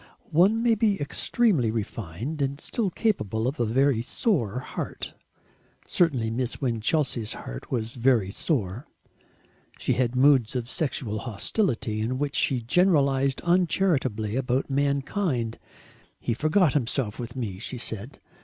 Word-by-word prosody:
One 195 +8 +4
may 235 -1 +4
be 210 -2 +2
extremely 145 - +1
refined 110 - -4
and 140 +1 -1
still 215 +3 -1
capable 115 - 0
of 135 +2 -3
a 120 - +2
very 130 +1 +3
sore 125 - 0
heart. 130 - -5 0.7
Certainly 130 -11 +1
Miss 125 +1 -2
Winchelsea's 120 -1 0
heart - - -8
was 115 -3 -2
very 120 -6 +2
sore. 115 - -2 0.9
She - - 0
had 125 -1 0
moods 130 -3 +4
of 120 -2 -2
sexual 120 -7 -2
hostility, 110 - -1
in 120 +4 -1
which 145 +1 -2
she 130 -3 +2
generalised 140 -3 +3
uncharitably 160 - +1
about 130 +1 0
mankind. 140 - 0 0.6
"He - - -1
forgot 155 - +3
himself 125 -5 -1
with 120 0 -6
me," 105 -7 -4
she 125 +4 -4
said. 115 +3 -6
130 Hz, 130 wpm, -26 LUFS, 115-150 Hz, 0.9 s, One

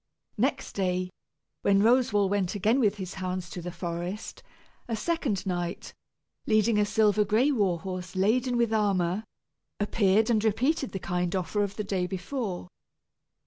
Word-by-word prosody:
Next - - 0
day, 185 -1 -1 0.5
when 200 0 +4
Roswal 225 -4 +4
went 195 -1 0
again 215 +6 +2
with 210 -5 +3
his 185 -2 -5
hounds 185 -2 -4
to 180 - -6
the 180 +1 -5
forest, 175 +3 -5 0.5
a 230 - -1
second 230 - -1
knight, 175 -1 -3 0.5
leading 215 0 +3
a 210 - +3
silver 210 -1 +3
gray 225 +8 +3
war 200 -9 +1
horse 185 -1 -6
laden 240 +6 +2
with 235 -2 +2
armor, 195 -2 +1 0.6
appeared 210 +1 +2
and 215 -2 +2
repeated 260 +6 +1
the - - -2
kind 180 -1 -2
offer 190 +3 -1
of 200 -1 -2
the 210 - -3
day 190 -3 -1
before. 190 -1 -4
200 Hz, 150 wpm, -28 LUFS, 185-220 Hz, 0.6 s, when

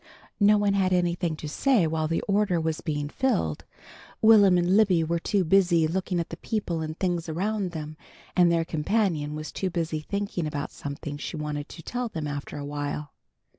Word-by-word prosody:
No 210 0 +6
one 205 -1 +2
had 190 -2 +2
anything 175 -2 +1
to 155 - -7
say 225 - +2
while 155 0 0
the 165 +1 -1
order 200 -3 +1
was 160 -1 -2
being 150 -2 -2
filled. 145 - -1 0.5
Will'm 205 -4 +6
and 175 +2 +2
Libby 190 -6 +4
were 170 +1 0
too 195 +3 +1
busy 175 -2 +4
looking 180 +1 -1
at 170 - -3
the 165 - -7
people 180 -6 -2
and 155 0 -5
things 175 -3 -1
around 195 +4 -1
them, 155 -2 -7 0.4
and 175 -2 +5
their 165 -1 +2
companion 160 -2 0
was 155 0 -6
too 190 - -2
busy 165 -3 -2
thinking 200 0 -3
about 145 -1 -4
something 145 0 -6
she 155 - -5
wanted 150 -1 -4
to 165 - -10
tell 245 +4 -3
them 160 -7 -4
after 145 -1 -5
awhile. 145 0 -4
170 Hz, 185 wpm, -26 LUFS, 155-195 Hz, 0.5 s, No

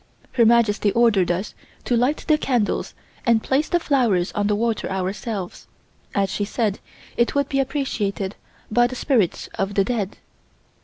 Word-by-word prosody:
Her 235 -3 +4
Majesty 220 -3 +3
ordered 225 -7 +3
us 180 +4 -2 0.3
to 245 - +1
light 250 +6 +1
the 310 - +5
candles 245 -8 -1 0.3
and 230 -3 +3
place 280 +4 +1
the 350 - +2
flowers 235 - +1
on 205 -1 0
the 210 - +2
water 225 0 -1
ourselves, 190 +1 -4 0.5
as 195 -2 +1
she 205 - -1
said 210 -1 -1 0.4
it 235 +3 +1
would 280 -1 +1
be 275 - 0
appreciated 220 -8 -2 0.4
by 240 +2 +4
the 255 - -7
spirits 235 - +1
of 195 +1 -1
the 195 - +4
dead. 210 -3 -2
225 Hz, 160 wpm, -22 LUFS, 200-250 Hz, 0.5 s, the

